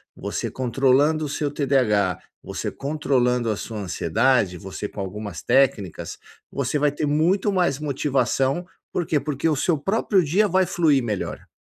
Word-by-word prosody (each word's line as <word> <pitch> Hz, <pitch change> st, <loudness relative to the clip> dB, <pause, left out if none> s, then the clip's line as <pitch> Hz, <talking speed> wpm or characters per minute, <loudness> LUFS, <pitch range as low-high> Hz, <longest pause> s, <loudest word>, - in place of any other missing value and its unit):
você -, -, -4 dB
controlando 135 Hz, +5 st, +2 dB
o -, -, -4 dB
seu 145 Hz, +1 st, -1 dB
TDH, 120 Hz, -, +1 dB, 0.2 s
você -, -, -4 dB
controlando 125 Hz, -5 st, 0 dB
a 105 Hz, -, -2 dB
sua 110 Hz, 0 st, -6 dB
ansiedade, 100 Hz, +2 st, +1 dB
você 95 Hz, +3 st, -6 dB
com 100 Hz, -, -11 dB
algumas 100 Hz, +2 st, -6 dB
técnicas, 125 Hz, -10 st, +1 dB, 0.3 s
você 140 Hz, +1 st, -1 dB
vai 145 Hz, 0 st, +3 dB
ter 150 Hz, +1 st, -2 dB
muito 170 Hz, +8 st, +2 dB
mais 180 Hz, -8 st, +1 dB
motivação. 140 Hz, +1 st, 0 dB, 0.3 s
Por 175 Hz, -, -1 dB
quê? 155 Hz, -, +1 dB
Porque 145 Hz, +2 st, -2 dB
o 150 Hz, -, +2 dB
seu 160 Hz, +4 st, +1 dB
próprio 195 Hz, +3 st, +1 dB
dia 190 Hz, +8 st, +2 dB
vai 190 Hz, 0 st, +2 dB
fluir 155 Hz, -7 st, +2 dB
melhor. 105 Hz, -4 st, -4 dB
140 Hz, 155 wpm, -23 LUFS, 115-155 Hz, 0.3 s, vai